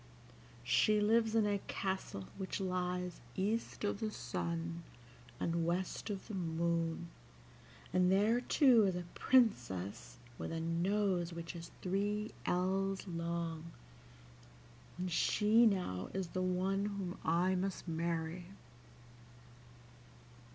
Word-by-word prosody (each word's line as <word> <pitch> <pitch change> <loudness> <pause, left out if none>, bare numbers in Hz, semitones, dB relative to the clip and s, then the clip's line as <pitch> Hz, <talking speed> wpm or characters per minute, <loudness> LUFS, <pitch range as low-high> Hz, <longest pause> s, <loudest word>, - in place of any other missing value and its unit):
She 120 - +4
lives 225 +1 +3
in 220 -2 +4
a 205 -1 +1
castle 190 - -3
which 190 +1 -4
lies 180 -1 -2
east 215 - -1
of 205 -1 0
the 220 - -1
sun 85 - -3 0.6
and 170 0 0
west 175 +5 -1
of 200 -2 -4
the 220 - -6
moon, 170 -1 -1 0.8
and 180 0 +4
there 215 +5 +4
too 245 -4 +5
is 190 -2 +1
a 180 - -3
princess 120 - +1 0.2
with - - -4
a 165 - -2
nose 175 +1 +1
which 170 +1 -6
is 170 0 -7
three 205 +3 0 0.2
ells 190 +2 0
long, 170 -1 -3 1.2
and 180 0 -3
she 220 +7 +4
now 180 - -1
is 190 -3 -2
the 185 - -2
one 185 +2 +1
whom 200 -3 -4
I 175 +3 +2
must 190 0 -2
marry." 165 +1 -2
180 Hz, 115 wpm, -35 LUFS, 165-200 Hz, 1.2 s, too